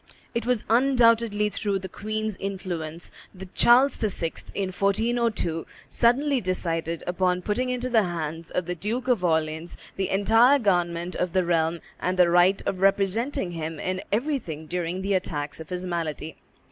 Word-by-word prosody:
It 235 0 -2
was 250 -3 +1
undoubtedly 230 -3 +3
through 200 0 -1
the 190 0 -6
queen's 215 +2 -3
influence 175 -4 -5 0.2
that 185 0 -11
Charles 255 +4 +5
VI., 185 -6 -1 0.2
in 195 -2 -1
1402, 200 -3 0 0.2
suddenly 260 +3 +2
decided 170 -3 -2
upon 180 0 0
putting 250 +6 -1
into 250 0 -1
the 235 -3 +4
hands 165 -1 -4
of 180 - -2
the 180 - -2
Duke 225 +9 -3
of 240 -8 +2
Orleans 160 0 -1 0.2
the 190 -1 -1
entire 225 +7 +5
government 175 -5 0
of 180 -2 -1
the 185 -1 +2
realm 165 -1 +1 0.2
and 185 +1 -1
the 175 -2 +5
right 180 +3 +4
of 185 - -2
representing 195 +2 +1
him 160 -2 -5
in 185 0 -2
everything 210 - -2
during 175 +2 -3
the 200 +1 0
attacks 150 -6 -2
of 160 - -9
his 180 0 -4
malady. 165 -3 -3
185 Hz, 160 wpm, -25 LUFS, 170-225 Hz, 0.2 s, Charles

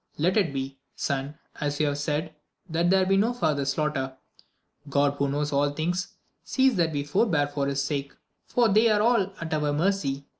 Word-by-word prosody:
Let 175 +5 +2
it 195 -8 +2
be, 135 0 -5 0.2
son, 140 +1 -3 0.2
as 145 -1 -2
you 155 - +3
have 145 0 -1
said, 150 +1 -2 0.3
that 170 0 +1
there 190 0 +4
may 185 - -2
be 195 - +4
no 225 +5 +2
far 170 -10 +1
ther 140 -1 -2
slaughter; 140 -2 -1 0.7
God, 140 0 +2
who 140 0 +1
knows 145 +1 -1
all 145 +1 +3
things, 175 +5 -2 0.3
sees 265 -2 +2
that 165 -2 +2
we 145 -2 -2
forbear 150 +1 +2
for 145 -1 -2
his 140 0 0
sake, 140 -1 -3 0.3
for 240 -2 +3
they 220 +2 +4
are 210 -1 +3
all 225 -5 +3
at 165 -1 -4
our 150 -1 +1
mercy. 145 -5 0
150 Hz, 200 wpm, -26 LUFS, 140-185 Hz, 0.7 s, there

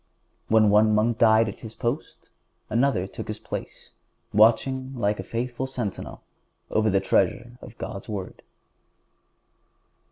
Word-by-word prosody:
When 110 -2 +4
one 105 +1 +5
monk 115 +2 +1
died 110 0 +5
at 110 - -6
his 110 -1 -10
post 120 +6 -4 0.4
another 120 -4 +2
took 95 - -8
his - - -4
place, - - -8 0.4
watching 130 +5 +3
like 105 -3 0
a - - -3
faithful 125 +2 -3
sentinel 120 -7 -5 0.5
over 110 0 +2
the 95 -1 +3
treasure 120 +6 0
of 115 - -12
God's 100 +3 -7
Word. 100 -3 -6
110 Hz, 130 wpm, -25 LUFS, 105-120 Hz, 0.5 s, one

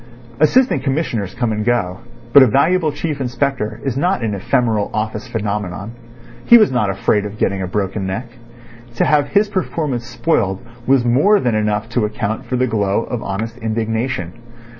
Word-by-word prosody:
Assistant 250 - +3
Commissioners 130 - -2
come 120 -2 -1
and 105 0 -2
go, 105 -6 0 0.3
but 140 - +9
a 130 - +7
valuable 155 - +2
Chief 145 0 -4
Inspector 125 -4 -2
is 135 -3 -1
not 175 -1 0
an 110 -2 -1
ephemeral 110 +1 0
office 110 +1 -3
phenomenon. 105 -3 -3 0.5
He 235 - +9
was 215 - +4
not 125 -6 +1
afraid 95 +2 +1
of 105 +1 -7
getting 95 -2 0
a 95 - -2
broken 100 +1 -2
neck. 115 +7 -3 0.7
To - - +2
have 145 -2 +3
his 205 +5 +2
performance 155 - -2
spoiled 115 - -1 0.2
was 130 -2 +3
more 145 - +4
than 125 -9 0
enough 105 0 0
to 115 -2 0
account 105 +1 -3
for 130 - -2
the 125 +1 +2
glow 105 -2 0
of 120 -2 -4
honest 115 +5 -4
indignation. 110 -3 -2
115 Hz, 170 wpm, -18 LUFS, 105-135 Hz, 0.7 s, but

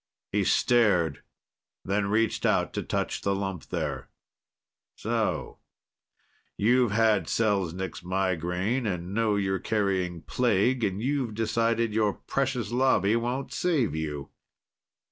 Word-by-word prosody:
He - - +1
stared, 95 - +3 0.6
then 100 +1 0
reached 110 +1 +1
out - - +2
to - - -2
touch - - -2
the 100 0 0
lump 95 -4 -4
there. - - -3 0.9
"So - - -2 1.0
you've 120 +3 +3
had 110 +1 +2
Selznik's 95 -7 -1
migraine 95 +5 -1
and 90 -1 -3
know 110 -1 +2
you're 95 -2 0
carrying 95 -6 -1
plague. 120 +1 +1
And 100 +1 -1
you've 130 -5 -1
decided 115 0 +1
your 105 -2 +2
precious 130 -5 -2
Lobby 120 -5 +3
won't 120 +3 -2
save 155 - +1
you?" 75 -3 -4
105 Hz, 115 wpm, -27 LUFS, 95-115 Hz, 1.0 s, stared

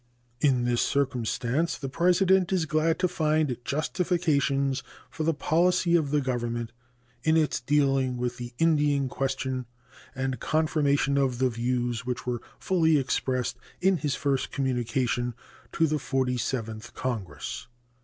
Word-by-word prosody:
In 125 -3 +2
this 120 -1 +2
circumstance 135 +3 0
the 135 - -5
President 180 +5 +3
is 180 -4 +2
glad 155 +1 +1
to 185 - +2
find 155 -5 +1
justification 150 -3 +1 0.4
for - - -6
the 160 +1 +3
policy 170 +3 +2
of 155 -4 +2
the 150 0 +2
Government 120 -3 -2 0.5
in 160 +1 +4
its 155 -2 +1
dealing 135 -2 +2
with 120 0 -2
the 120 -1 -6
Indian 145 -4 +2
question 130 -1 -2 0.5
and 130 -2 -2
confirmation 145 -3 +1
of 130 -3 +1
the 130 0 +2
views 120 0 -1
which 125 0 -4
were 120 -2 -2 0.2
fully 160 -4 +3
expressed 130 -2 -1 0.2
in 190 0 +3
his 145 -2 -1
first 140 -2 0
communication 125 -2 -1 0.4
to 165 - +3
the 155 -1 0
Forty 130 -2 0
seventh 115 -2 -4
Congress. 105 - -4
135 Hz, 135 wpm, -27 LUFS, 125-155 Hz, 0.5 s, in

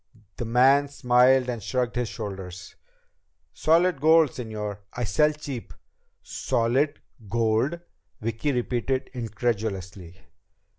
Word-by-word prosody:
The 120 - -3
man 130 +5 +4
smiled 125 -1 +3
and 120 -3 -3
shrugged 125 +4 -2
his 120 -2 -1
shoulders. 95 -5 -7 0.8
"Solid 165 -1 +2
gold, 160 0 +6
señor. 105 -4 -5
I 125 - -3
sell 150 +7 +3
cheap." 145 -5 -7 0.5
"Solid 130 +6 0 0.3
gold?" 115 - +1 0.4
Vicki 115 +6 -2
repeated 130 +1 -1
incredulously. 105 -6 -3
120 Hz, 100 wpm, -25 LUFS, 110-135 Hz, 0.8 s, gold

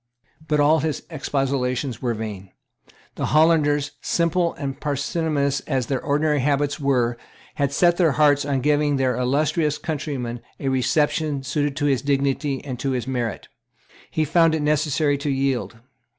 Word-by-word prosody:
But 150 -1 +1
all 150 +2 +4
his 155 0 -2
expostulations 135 -4 -2
were 120 -3 -1
vain. 105 -3 -6 0.7
The - - -1
Hollanders, 150 -3 +3
simple 170 0 +1
and 135 -3 -5
parsimonious 145 0 -1
as 130 -4 0
their 130 0 -2
ordinary 150 +1 +1
habits 140 +1 0
were, 125 -4 +1 0.3
had 140 -1 0
set 175 +3 +3
their 165 -5 +3
hearts 145 0 +4
on 140 -2 -1
giving 145 +1 +2
their 130 -2 +1
illustrious 150 +4 +1
countryman 135 -7 -4 0.2
a 135 - -1
reception 145 +2 0
suited 145 +2 -1
to 145 - -1
his 135 -3 +2
dignity 140 0 -1
and 130 -4 -5
to 135 - -1
his 125 -3 -2
merit; 120 -5 -3
and - - -39 0.2
he 155 - 0
found 165 +1 +3
it 155 - -2
necessary 150 -1 +1
to 145 - -2
yield. 135 -3 -1
140 Hz, 155 wpm, -23 LUFS, 130-150 Hz, 0.7 s, all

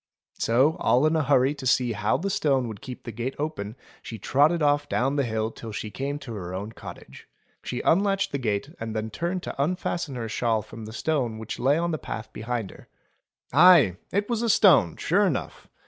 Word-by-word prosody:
So, 135 +9 +3
all 125 +5 +3
in 155 +1 +2
a 160 - +2
hurry 135 -1 +3
to 140 -3 -5
see 125 -1 +2
how 105 +2 0
the 195 +7 -2
stone 140 - +1
would 110 -3 -8
keep 125 -2 -9
the 115 - -6
gate 120 +4 -4
open 140 -9 -4 0.3
she 115 - -7
trotted 150 - +2
off 145 0 +2
down 135 +3 +1
the 140 - +2
hill 110 -2 -2
till 115 -1 -9
she 105 0 -5
came 140 +4 -3
to 130 -5 -8
her 90 -3 -6
own 100 +4 -5
cottage. - - -11 0.3
She 125 - -4
unlatched 195 +1 +2
the 140 - -2
gate 115 +5 -2
and 110 -1 -5
then 110 0 -3
turned 175 - -3
to - - -4
unfasten 170 -3 -2
her 115 -2 -4
shawl 110 -1 0
from 110 0 -10
the 110 - -8
stone 125 -3 -1
which 110 0 -6
lay 135 +4 +3
on 170 +1 0
the 155 - -2
path 110 0 -7
behind 115 -2 -4
her. - - -16 0.7
Aye! 155 - +7
it 205 +1 0
was 235 -2 -1
a 235 - 0
stone 170 - +5
sure - - +2
enough. - - -4
130 Hz, 210 wpm, -25 LUFS, 110-155 Hz, 0.7 s, Aye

